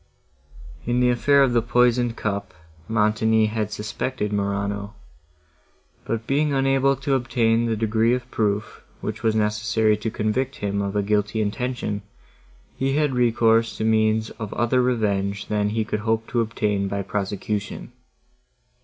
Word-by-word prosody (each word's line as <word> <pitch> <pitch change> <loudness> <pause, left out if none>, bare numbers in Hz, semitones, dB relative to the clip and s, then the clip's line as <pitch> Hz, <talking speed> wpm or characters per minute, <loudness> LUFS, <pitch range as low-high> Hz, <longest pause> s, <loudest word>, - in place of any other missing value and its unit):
In 120 +1 +1
the 125 0 +4
affair 140 +4 +4
of 130 -3 +2
the 120 - +3
poisoned 120 0 +2
cup, 100 -1 -3 0.3
Montoni 110 0 +2
had 110 -1 -2
suspected 105 +1 -3
Morano; 100 +1 -2 1.1
but, 115 0 -3
being 145 +3 +1
unable 135 0 +2
to 135 +1 -2
obtain 120 -2 +1
the 115 - 0
degree 110 +2 +2
of 125 0 -7
proof, 105 -1 -1 0.2
which - - -4
was 110 -2 +1
necessary 110 0 +2
to 105 +2 -3
convict 125 +6 -1
him 100 0 -2
of 100 0 -3
a 105 - +1
guilty 105 +1 0
intention, 110 -1 -2 0.7
he 135 0 0
had 150 -2 +1
recourse 115 -2 +2
to - - -2
means 110 0 +2
of 105 - -4
other 120 +2 +2
revenge, 100 -5 0
than 105 -1 +1
he 110 +1 -1
could 105 - -2
hope 110 +1 0
to 120 - +1
obtain 105 -3 -1
by 100 0 -2
prosecution. 100 +1 -4
110 Hz, 145 wpm, -23 LUFS, 105-120 Hz, 1.1 s, the